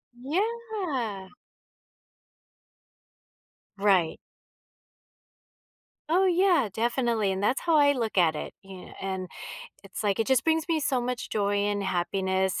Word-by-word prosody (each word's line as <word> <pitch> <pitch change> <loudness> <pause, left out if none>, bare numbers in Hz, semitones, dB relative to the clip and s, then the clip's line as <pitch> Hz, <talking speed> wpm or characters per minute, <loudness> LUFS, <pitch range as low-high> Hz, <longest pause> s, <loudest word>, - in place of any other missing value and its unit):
Yeah. 315 - -2 2.5
Right. 195 -5 +2 1.9
Oh 365 +4 +4
yeah, 355 - +3
definitely, 235 -2 +1
and 190 +1 -3
that's 245 +6 +2
how 335 -2 +2
I 290 -1 +6
look 230 -7 -2
at 170 -3 +5
it, - - -5
yeah, 190 -2 -11
and 190 -1 -3 0.6
it's, 195 - -6
like, 200 -2 +1
it 225 - +1
just 265 -2 +3
brings 320 -1 +2
me 325 -2 +1
so 265 -3 +1
much 245 0 -4
joy 205 -1 +1
and 205 0 0
happiness. 190 +1 0
225 Hz, 120 wpm, -27 LUFS, 195-300 Hz, 2.5 s, I